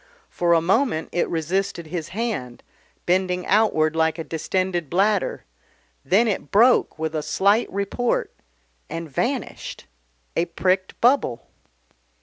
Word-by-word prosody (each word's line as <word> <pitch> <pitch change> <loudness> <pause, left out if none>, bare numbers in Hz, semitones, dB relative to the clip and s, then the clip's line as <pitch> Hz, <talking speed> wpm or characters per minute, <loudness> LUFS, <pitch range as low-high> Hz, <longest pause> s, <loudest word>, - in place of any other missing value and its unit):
For 175 -1 +2
a 165 - +4
moment 195 - +1
it 175 - 0
resisted 175 +2 -2
his 160 0 -5
hand, 185 - -4 0.4
bending 180 0 +1
outward 160 -7 +2
like 160 0 +1
a 165 - -4
distended 175 0 -2
bladder, 195 +2 +1 0.6
then 205 - +3
it 195 -9 -2
broke 235 +5 +4
with 160 0 -3
a 155 - -1
slight 200 +8 +2
report 200 +5 -1 0.6
and 165 0 -5
vanished 240 - -3 0.5
a 170 - +2
pricked 185 +2 -1
bubble. 245 - +2
180 Hz, 125 wpm, -23 LUFS, 160-205 Hz, 0.6 s, a